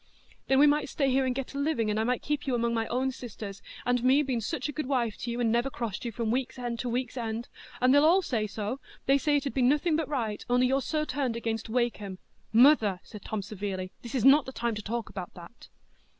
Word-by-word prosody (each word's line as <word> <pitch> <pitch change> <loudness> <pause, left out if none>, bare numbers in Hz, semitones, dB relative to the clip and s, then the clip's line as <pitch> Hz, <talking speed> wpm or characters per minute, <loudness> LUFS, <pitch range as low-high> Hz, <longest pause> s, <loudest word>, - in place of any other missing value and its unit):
"Then 265 - +3
we 285 - +7
might 295 0 +2
stay 275 -3 +1
here 265 0 +2
and 250 - -1
get 270 +1 -4
a 280 - -4
living, 280 -8 +1
and 210 - 0
I - - +2
might 250 +2 0
keep 295 -1 -2
among 235 -2 +1
my 225 -1 0
own 260 +2 0
sisters,—and 240 +1 -5
me 270 +4 +5
been 255 -4 -1
such 250 +5 -2
a - - -3
good 305 -2 -4
wife 240 -6 0
to - - -4
you, 235 +1 -3
and 230 -2 +2
never 240 +3 +1
crossed 235 -4 -4
you 235 - -2
from 225 0 -2
week's 255 +1 -1
end 240 -2 -4
to 250 - -2
week's 250 +2 -2
end—and 235 +2 -2
they 285 - +7
all 340 +6 +5
say 220 -8 -1
so—they 250 +6 -2
say 295 +1 +2
it 285 - -3
'ud 275 - -2
be 265 - 0
nothing 295 +6 +3
but 320 -1 -1
right, 225 -8 -2
only 250 +1 +4
you're 265 +2 +2
so 305 +2 -1
turned 260 -3 -1
against 225 -1 -3
Wakem." 220 -5 -1 0.3
"Mother," 225 -6 +5
said 210 - -11
Tom, 215 -2 -3
severely, 190 -2 -4
"this 240 +2 -7
is 255 - +1
not 275 +1 +7
the - - -4
time 235 -2 -2
to 215 - -4
talk 230 +2 -3
about 185 -2 -7
that." 175 +6 -13
245 Hz, 240 wpm, -28 LUFS, 225-270 Hz, 0.3 s, we